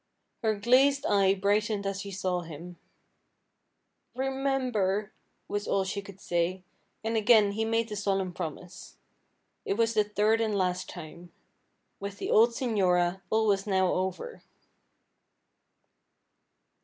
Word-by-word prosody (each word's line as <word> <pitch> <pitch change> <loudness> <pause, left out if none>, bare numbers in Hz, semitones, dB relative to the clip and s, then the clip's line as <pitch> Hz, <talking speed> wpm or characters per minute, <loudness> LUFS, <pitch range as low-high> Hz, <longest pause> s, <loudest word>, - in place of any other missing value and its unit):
Her 220 -1 +1
glazed 260 +6 +3
eye 195 -1 +3
brightened 205 +1 0
as 195 0 -2
she 200 - -7
saw 185 -2 -2
him. 170 +2 -10 1.4
"Remember," 255 -7 -1 0.4
was 205 0 -3
all 195 - +1
she 195 +1 -3
could 200 -1 -13
say, 175 +1 -1 0.4
and 225 +1 -1
again 215 -1 +5
he 220 +2 -1
made 225 0 0
the 210 - -6
solemn 195 -2 -1
promise. 170 +2 -8 0.7
It 195 - -1
was 230 +1 +1
the 215 -1 +3
third 210 +2 +1
and 215 -2 0
last 180 -1 -1
time. 170 +1 -10 0.7
With 200 0 -6
the - - -3
old 225 +3 +6
señora 190 -7 +1
all 220 0 +2
was 200 -1 +1
now 190 -2 +2
over. 190 - -3
200 Hz, 130 wpm, -28 LUFS, 185-220 Hz, 1.4 s, old